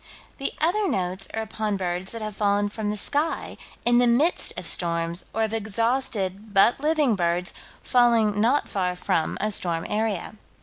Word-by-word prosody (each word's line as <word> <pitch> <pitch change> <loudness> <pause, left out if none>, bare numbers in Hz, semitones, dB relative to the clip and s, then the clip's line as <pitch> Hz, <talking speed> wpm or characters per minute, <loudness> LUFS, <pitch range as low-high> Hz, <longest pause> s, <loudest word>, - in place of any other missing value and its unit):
The 275 - -2
other 385 +6 +2
notes 185 +1 -2
are 225 - -3
upon 215 -1 -3
birds 180 0 -3
that 230 -1 -6
have 215 -1 -5
fallen 205 0 +1
from 210 0 -4
the 210 - -2
sky, 295 +9 -1 0.3
in 240 0 +5
the 245 - +4
midst 280 +9 +2
of - - -4
storms, 170 0 0
or 225 - 0
of 220 0 -2
exhausted, 220 -2 -1
but 195 +6 +5
living, 300 -5 +2
birds, 175 0 -1 0.3
falling 230 -4 +3
not 250 +6 +2
far 180 -2 -1
from 165 -2 -1
a 215 +1 0
storm 170 -4 +2
area. 215 -2 -2
215 Hz, 170 wpm, -25 LUFS, 190-240 Hz, 0.3 s, in